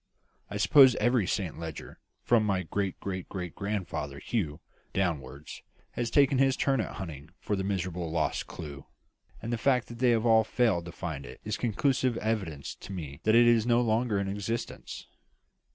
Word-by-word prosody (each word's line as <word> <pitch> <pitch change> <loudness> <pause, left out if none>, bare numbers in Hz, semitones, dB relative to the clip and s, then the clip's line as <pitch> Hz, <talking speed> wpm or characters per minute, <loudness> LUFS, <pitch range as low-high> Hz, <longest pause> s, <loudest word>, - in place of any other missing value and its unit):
I 105 - -4
suppose 130 +4 +7
every 120 -6 +2
Saint 90 -5 -2
Leger, 80 -2 -7 0.2
from 120 -2 +4
my 95 -3 0
great 95 +2 -2
great 95 -2 -5
great 90 -3 -5
grandfather 95 -9 -3
Hugh, 80 -4 -2 0.3
downwards, 75 -6 -3 0.3
has 120 -1 -2
taken 140 -1 +4
his 135 -1 +3
turn 135 -4 +2
at - - -5
hunting 75 -6 -7
for 105 - -1
that 95 - -2
miserable 90 -3 -2
lost 80 -1 -1
clue; 70 -3 -8 0.6
and 115 - -2
the 115 - -1
fact 130 -2 +2
that 120 0 -9
they 120 -2 +4
all 110 0 +4
failed 110 -7 +1
to 85 - -7
find 80 -5 -5
it - - -10
is 105 - -2
conclusive 125 +1 +1
evidence 95 -10 -2
to - - -10
me 75 -6 -6
that 110 +1 +5
it 120 +1 +7
is 120 -1 +4
no 120 0 +4
longer 115 -1 +1
in 100 0 -1
existence." 105 +4 -4
100 Hz, 175 wpm, -29 LUFS, 85-120 Hz, 0.6 s, suppose